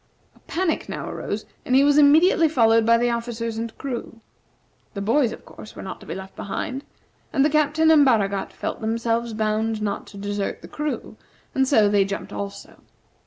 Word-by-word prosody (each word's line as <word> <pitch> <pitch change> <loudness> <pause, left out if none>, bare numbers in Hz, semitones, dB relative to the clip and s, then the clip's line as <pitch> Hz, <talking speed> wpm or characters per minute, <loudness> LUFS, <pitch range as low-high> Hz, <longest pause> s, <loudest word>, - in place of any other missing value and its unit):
A - - -23
panic 345 -1 -1
now - - -5
arose, - - -4 0.2
and 255 - +1
he 270 - +6
was 290 0 +4
immediately 320 +3 +5
followed 230 -5 +4
by 230 0 +6
the 240 +1 +1
officers 230 -1 -3
and 230 -1 -5
crew. 240 -3 -6 0.8
The 200 - -3
boys, 230 +4 +2
of - - -10
course, 215 - -12
were - - -8
not 190 - -7
to - - -14
be - - -4
left 190 0 -9
behind; 260 +7 -4 0.5
and 275 -2 +3
the 300 - +2
Captain 305 +1 +3
and 305 -2 +7
Baragat 200 -7 +1
felt - - -5
themselves 230 +1 -1
bound 215 0 0
not 205 -1 -3
to 200 - -12
desert 205 0 -3
the - - -9
crew, 300 0 -4 0.4
and 265 0 +2
so 220 -7 +4
they 205 -1 +3
jumped 195 - -5
also. 100 0 -7
230 Hz, 190 wpm, -23 LUFS, 210-280 Hz, 0.8 s, and